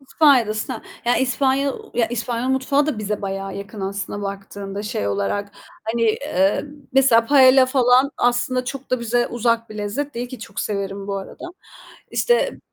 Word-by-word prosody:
İspanya'dasın 265 -6 +2
ha, - - -7 0.2
yani 240 +1 +3
İspanya 270 +1 +1 0.2
Ya, 235 -2 +2
İspanyol 240 +1 -2
mutfağı 270 +2 +2
da 280 -8 -2
bize 210 0 -3
bayağı 195 0 -4
yakın 200 +1 -8
aslında 200 +1 -4
baktığında 200 0 -6
şey 155 - -2
olarak. 100 - -2 0.3
Hani, 230 +1 -1
eee, 215 -4 +1 0.3
mesela 250 -4 +5
paella 260 -1 +6
falan 255 +1 +4
aslında 245 +1 +1
çok 270 +1 -7
da 255 - +1
bize 240 +1 +1
uzak 230 -1 0
bir 215 - -8
lezzet 270 +8 -3
değil 240 +1 -4
ki 255 - -8
çok 200 -2 -6
severim 200 -1 -3
bu 200 - -2
arada. 195 - -8 0.7
İşte 485 +1 +1
235 Hz, 160 wpm, -21 LUFS, 200-260 Hz, 0.7 s, paella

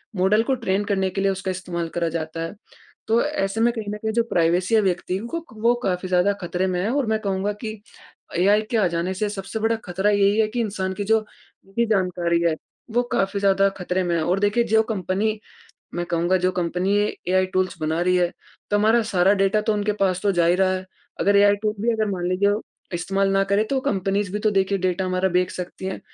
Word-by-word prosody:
Model 200 +4 +3
को 265 - 0
train 195 0 +1
करने 190 -2 0
के 195 +1 -3
लिए 195 0 +2
उसका 190 0 -3
इस्तेमाल 175 -2 -4
करा 170 -1 +1
जाता 160 0 -4
है। 165 - -6 0.5
तो 230 +2 +3
ऐसे 225 -8 -1
में 240 - +4
कहीं 220 -3 -5
न - - -4
कहीं 220 +1 -2
जो 235 +1 +2
प्राइवेसी 180 +6 +2
व्यक्तियों 185 +2 -1
को, 335 +6 -5 0.2
वो 235 +1 +4
काफ़ी 185 0 -1
ज़्यादा 185 +2 +3
खतरे 180 +2 -1
में 180 -1 -1
है, 205 - 0
और 280 -2 +1
मैं 220 0 0
कहूँगा 200 0 -1
कि 215 -2 -6 0.6
एआई 205 +4 +4
के 235 - +1
आ 210 -4 +3
जाने 170 +2 -2
से 210 +3 -1
सबसे 205 +1 -5
बड़ा 225 +1 +1
खतरा 190 +3 0
यही 205 +1 +3
है 215 - +2
कि 240 +2 -3
इंसान 195 -4 -2
की 200 +1 -3
जो 220 +2 +3 0.5
निजी 230 +4 -1
जानकारी 180 -4 +1
है। 165 -2 +2 0.4
वो 245 - +4
काफ़ी 195 +1 0
ज़्यादा 195 0 +4
खतरे 180 0 -1
में 175 - 0
है 160 - 0
और 180 +4 +1
देखिए 205 +4 +2
जो 220 -1 +3
कंपनी, 205 +3 -1 0.6
मैं 175 0 -2
कहूँगा 175 +2 +1
जो 185 +1 +1
कंपनी 180 +2 0 0.3
एआई 185 0 +3
टूल्स 185 0 0
बना 160 +2 0
रही 180 +1 +2
है। 175 -1 +2 0.4
तो 205 - +3
हमारा 220 +3 +4
सारा 185 +2 +4
डाटा 195 +1 +2
तो 220 +1 0
उनके 210 0 0
पास 185 -2 +2
तो 205 -1 +2
जा 175 -2 +2
ही 175 - +4
रहा 190 0 +2
है 185 - -4 0.4
अगर 200 0 +3
एआई 205 0 +5
टूल 215 0 0
भी 235 +1 +2
अगर 215 -2 0
मान 180 -2 -2
लीजिए 200 +3 +2 0.4
इस्तेमाल 195 +3 0
ना 195 0 +3
करें। 200 +2 +1
तो 275 - +1
कम्पनीज़ 195 -2 -1
भी 210 - -1
तो 215 0 +2
देखिए 195 0 +1
डाटा 185 0 0
हमारा 185 +1 +1
देख 180 0 +1
सकती 180 +1 -6
हैं, 190 - -4
195 Hz, 225 wpm, -23 LUFS, 180-210 Hz, 0.6 s, एआई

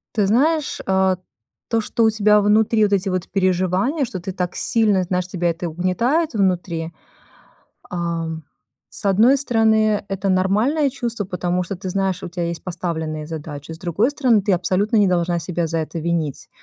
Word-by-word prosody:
Ты 210 - +3
знаешь, 300 +7 +1
э, 190 -1 +2 0.5
то, 230 -1 +1
что 230 +2 -1
у - - +5
тебя 210 -1 +4
внутри 215 +1 +3
вот 205 -1 +2
эти 195 0 +1
вот 185 -1 -2
переживания, 185 - +1
что 190 - -6
ты 185 +2 -5
так 180 -1 -3
сильно 210 -5 +2
знаешь, 180 0 -2
тебя 175 -2 -1
это 170 +1 -3
угнетает 230 - 0
внутри. 175 -4 -1 1.0
Ам, 165 -2 -3 0.5
с - - -11
одной 225 +8 +5
стороны, 220 -5 +2
это 195 0 -2
нормальное 215 +11 +2
чувство, 235 -5 -3
потому 180 -1 -1
что 190 +3 -5
ты 185 +1 -6
знаешь, 190 -1 -1
у - - -5
тебя 175 0 -4
есть 170 0 -5
поставленные 160 -4 -4
задачи, 150 -1 -7
с 160 - -7
другой 190 - 0
стороны, 250 -7 +3
ты 200 +1 0
абсолютно 185 +5 +1
не 205 -2 +4
должна 175 -1 +1
себя 170 +1 -2
за 165 +1 -1
это 160 +2 -4
винить. 160 -3 -2
185 Hz, 175 wpm, -21 LUFS, 175-215 Hz, 1.0 s, у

